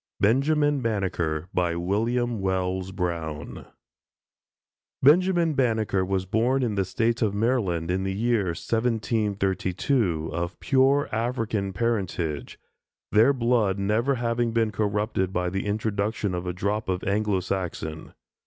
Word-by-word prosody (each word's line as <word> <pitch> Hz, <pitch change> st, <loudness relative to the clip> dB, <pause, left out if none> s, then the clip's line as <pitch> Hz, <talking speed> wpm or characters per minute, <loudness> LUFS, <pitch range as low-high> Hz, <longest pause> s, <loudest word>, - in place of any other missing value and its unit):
BENJAMIN 145 Hz, +6 st, +2 dB
BANNEKER 90 Hz, -8 st, -1 dB
WILLIAM 105 Hz, +8 st, 0 dB
WELLS 95 Hz, 0 st, -1 dB
BROWN 85 Hz, -5 st, -4 dB, 1.4 s
Benjamin 170 Hz, +2 st, +4 dB
Banneker 110 Hz, -7 st, +1 dB
was 95 Hz, 0 st, -1 dB
born 120 Hz, +7 st, +1 dB
in 115 Hz, -4 st, 0 dB
the 100 Hz, -2 st, 0 dB
State 115 Hz, +5 st, 0 dB
of 105 Hz, -3 st, +1 dB
Maryland, 100 Hz, -7 st, 0 dB
in 95 Hz, +1 st, 0 dB
the 95 Hz, -, -1 dB
year 115 Hz, -1 st, +1 dB
1732, 100 Hz, -, 0 dB
of 85 Hz, +2 st, -3 dB
pure 135 Hz, +2 st, +3 dB
African 110 Hz, -3 st, -1 dB
parentage; 90 Hz, -, -2 dB, 0.5 s
their 110 Hz, +6 st, +6 dB
blood 115 Hz, -6 st, +1 dB
never 110 Hz, +7 st, +1 dB
having 120 Hz, -1 st, 0 dB
been 115 Hz, -2 st, +1 dB
corrupted 105 Hz, -2 st, -1 dB
by 90 Hz, -1 st, -1 dB
the 95 Hz, +2 st, -2 dB
introduction 105 Hz, -1 st, -1 dB
of 90 Hz, 0 st, -3 dB
a 90 Hz, -, -1 dB
drop 100 Hz, +3 st, -2 dB
of 90 Hz, 0 st, -1 dB
Anglo 105 Hz, -1 st, +1 dB
Saxon. 85 Hz, -4 st, -4 dB
105 Hz, 120 wpm, -25 LUFS, 95-115 Hz, 1.4 s, their